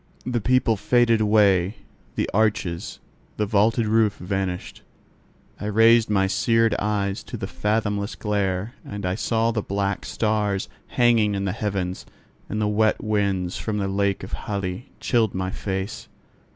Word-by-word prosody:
The 120 -2 -1
people 125 -1 +2
faded 115 +1 +3
away, 105 -2 +3 0.4
the - - 0
arches, 100 -5 0 0.4
the 105 - +1
vaulted 110 +3 +2
roof 110 -1 +2
vanished. 95 -1 -3 0.8
I - - -5
raised 115 +2 +5
my 95 -2 +3
seared 115 +3 +2
eyes 100 -1 -1
to 120 - -6
the 105 - -4
fathomless 105 0 -1
glare, 100 0 -1
and 100 -2 -6
I 90 - 0
saw 115 +2 +1
the 110 -2 -1
black 100 0 -2
stars 105 -3 0 0.2
hanging 115 -4 +3
in 100 0 -2
the 95 - 0
heavens: 95 -3 -3 0.4
and 105 - -2
the 105 - +1
wet 110 +1 +2
winds 100 -4 0
from 110 -2 -3
the 100 -1 -1
lake 100 0 0
of - - -8
Hali 100 +3 -4
chilled 115 -5 +1
my 95 0 -2
face. 95 +1 -4
105 Hz, 150 wpm, -24 LUFS, 95-110 Hz, 0.8 s, raised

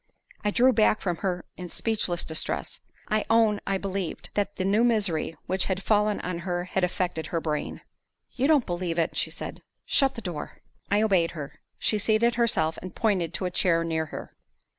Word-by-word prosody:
I 210 - +2
drew 255 +5 +4
back 215 -1 +4
from 175 -3 -2
her 180 -1 -2
in 180 -1 -7
speechless 195 -6 0
distress. 160 -1 -1 0.3
I 215 0 +2
own 225 -2 +4
I 195 - +1
believed 190 -2 -4
that 205 0 -1
the 185 - -2
new 205 +4 +3
misery 200 -9 +1
which 185 +1 0
had 190 0 -2
fallen 210 -1 +2
on 180 -1 -3
her 175 0 -2
had 185 +1 -2
affected 175 -3 -1
her 165 - -1
brain. 155 -2 -3 0.5
"You 265 +2 0
don't 295 -5 +4
believe 175 -1 -2
it," 165 - 0
she - - 0
said. - - -7 0.2
"Shut 270 -3 +3
the 230 - -6
door." 175 -7 -6 0.3
I 205 +2 +3
obeyed 185 -6 +3
her. 145 -2 -7 0.2
She 215 - +2
seated 220 +3 +3
herself, 195 -10 +2
and 185 -1 -8
pointed 190 -7 +1
to 185 - -2
a 180 - -1
chair 165 -2 +2
near 160 -1 -1
her. - - -8
190 Hz, 190 wpm, -27 LUFS, 170-215 Hz, 0.5 s, drew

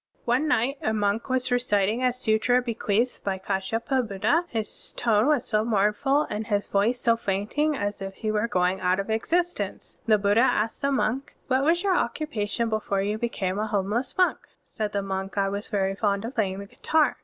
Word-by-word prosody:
(34) - - -37
One 285 +6 +2
night 275 0 +1
a 220 - 0
monk 210 +3 0
was 255 -1 0
reciting 225 -2 +1
a 250 - +4
sutra 245 0 +2
bequeathed 235 -1 -1
by 195 -1 -1
KAshyapabuddha. 225 - 0
His 220 -2 -4
tone 225 0 +2
was 295 -5 +2
so 215 -1 +1
moumftd, 230 +7 +2
and 210 +1 -3
his 205 -2 0
voice 220 +5 +1
so 230 -2 +3
fainting, 230 +9 -1
as 205 -3 -3
if 195 0 -5
he 215 +1 -2
were 215 +1 +1
going 180 -3 +1
out 185 +1 +2
of 195 +3 -3
existence. 345 +10 -1
The 215 -1 +5
Buddha 205 +2 +2
asked 225 -3 +1
the 280 0 +1
monk, 265 0 -1
"What 260 +1 +2
was 340 +5 +2
your 385 -2 +2
occupation 235 -6 -1
before 215 -3 -1
you 210 +2 -2
became 200 -5 -2
a 215 - -1
homeless 210 +5 -1
monk?*' 365 -1 +1 0.2
Said 215 -1 -4
the 200 -1 -1
monk, 195 0 -4
"I 195 -1 +2
was 200 +1 -4
very 195 -1 0
fond 200 +1 0
of 240 - -5
playing 195 -5 0
the 200 - -6
guitar." 310 +9 +1
220 Hz, 195 wpm, -26 LUFS, 200-250 Hz, 0.2 s, The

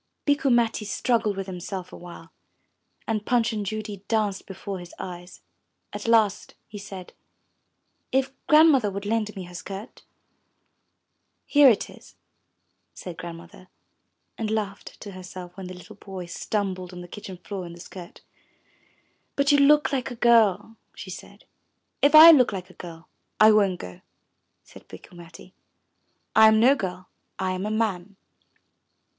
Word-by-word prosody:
'* - - -54
Bikku 285 -1 +2
Matti 235 -2 +2
struggled 210 +1 0
with 195 - -3
himself 185 0 -7
a - - -7
while, 170 -1 -12 0.8
and 215 -2 -1
Punch 230 -1 +1
and 210 -1 -3
Judy 210 -1 -6
danced 210 -4 -1
before 195 0 -7
his 175 0 -12
eyes. 180 0 -9 0.5
At - - -6
last 220 -4 +2
he 210 - -9
said, 195 -2 -10 1.0
'*If 265 0 +1 0.2
Grandmother 300 -8 +5
would 200 +1 -6
lend 215 0 -1
me 190 - -6
her 180 0 -12
skirt?*' 195 +5 -9 1.4
Here 290 -2 +6
it 220 - +1
is," - - -16 0.8
said 180 -2 -8
Grandmother, 170 +2 -10 0.7
and 220 -2 -2
laughed 210 -2 -4
to 205 - -8
herself 185 -1 -10
when 190 -2 -8
the 185 - -8
little 180 +4 -13
boy 190 -3 -8
stumbled 185 0 -4
on 180 - -8
the 175 - -10
kitchen 190 -1 -9
floor 190 +1 -7
in 170 - -10
the 170 - -13
skirt. 175 0 -11 1.1
But 280 +1 +2
you 285 - +5
look 295 +1 +4
like 265 -1 -1
a 245 - -7
girl," 225 -2 +3 0.2
she - - -9
said. - - -12 0.6
'If 290 +2 +5
I 320 +2 +12
look 260 -8 +5
like 185 -2 -7
a - - -19
girl, 165 -2 -11 0.3
I 215 0 +8
won't 200 -4 +2
go," 90 -1 -10 0.6
said - - -17
Bikku - - -14
Matti. 175 +2 -14 0.8
I 220 0 +8
am 220 0 +5
no 250 +5 +6
girl, 185 -7 -5 0.3
I 190 -1 -1
am 185 +2 -3
a - - -2
man." 210 -3 -2
200 Hz, 155 wpm, -25 LUFS, 185-225 Hz, 1.4 s, I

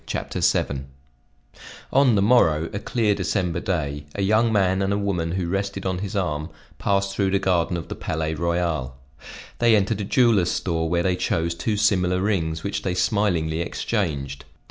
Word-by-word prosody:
CHAPTER - - -3
VII 70 -1 +1 1.1
ON 135 -4 +5
the 100 - +3
morrow, 85 -9 +3
a 100 - -2
clear 105 0 +1
December 90 -3 -1
day, 75 -6 -2
a 100 - -1
young 110 +3 +3
man 95 -2 +2
and 95 0 0
a 100 - +1
woman 90 -5 -1
who 90 -2 -2
rested 100 +1 -3
on 95 -1 -1
his 100 0 -5
arm, 75 -5 -1 0.3
passed 100 -1 0
through 100 -2 +1
the 100 - +2
garden 90 -2 +1
of 85 - -6
the - - -5
Palais 80 0 -3
Royal. 85 -6 -1 0.6
They 115 -1 +5
entered 105 +1 +1
a - - -2
jeweler's 110 -4 +3
store 80 -3 -1
where 85 0 +1
they 90 0 +1
chose 85 -1 -1
two 105 +5 -2
similar 90 -4 +2
rings 85 -6 -1
which 100 - -2
they 90 -2 -2
smilingly 90 -5 +1
exchanged. 70 - -2
95 Hz, 175 wpm, -23 LUFS, 80-100 Hz, 1.1 s, ON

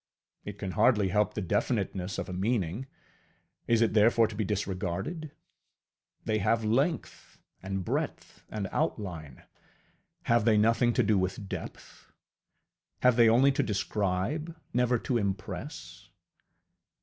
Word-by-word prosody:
It 105 -1 -7
can 95 -2 -4
hardly 105 -1 +3
help 105 +2 +1
the 105 - -2
definiteness 95 0 -1
of - - -3
a 90 - -6
meaning: 100 +3 -1 0.8
is 115 0 +4
it 115 - +1
therefore 115 +2 +5
to 110 - -8
be 110 - -1
disregarded? 100 - -3 1.0
They 110 -1 +1
have 110 +2 +1
length, 140 +10 -1 0.2
and 95 -1 -4
breadth, - - -4
and 105 -3 -3
outline: 90 - -3 0.8
have 120 -2 +3
they 110 -1 +4
nothing 115 +2 +3
to 125 - +2
do 105 -2 +3
with 95 +2 -3
depth? - - -9 0.9
Have 125 -1 +5
they 115 -1 +6
only 130 +5 +5
to - - +1
describe, 105 - -2 0.2
never 125 0 +2
to 120 +1 -1
impress? 100 - -5
105 Hz, 130 wpm, -29 LUFS, 95-120 Hz, 1.0 s, they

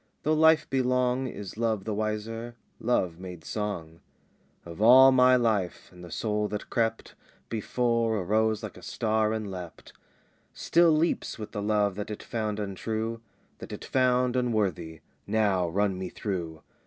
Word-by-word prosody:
Though 155 - +2
life 160 0 +4
be 135 -1 +1
long 125 +1 +1
Is 105 -4 -8
love 110 -3 0
the 110 - -3
wiser? 110 +2 -3 0.2
Love 90 -8 0
made 90 -3 -9
song 85 -7 -4 0.7
"Of 85 +3 -9
all 130 +4 +8
my 130 0 +6
life; 110 -7 0
and 90 -1 -14
the 90 - -9
soul 105 +4 -1
that 105 0 -6
crept 115 -1 -1 0.4
Before, 115 0 0
arose 110 +3 +1
like - - -7
a - - -12
star 110 -1 0
and 110 -3 -3
leapt: 90 -3 -9 0.6
"Still 170 0 +3
leaps 160 +2 +1
with 110 -1 -7
the 105 - -4
love 105 -1 +1
that 105 +1 -4
it 105 - -6
found 110 -2 -3
untrue, 110 +3 -3 0.4
That - - -9
it - - -7
found 125 -1 +2
unworthy. 100 -10 -1 0.3
Now 100 -5 +1
run 95 +1 0
me 95 -1 -4
through! 85 -7 -5
110 Hz, 155 wpm, -27 LUFS, 100-120 Hz, 0.7 s, all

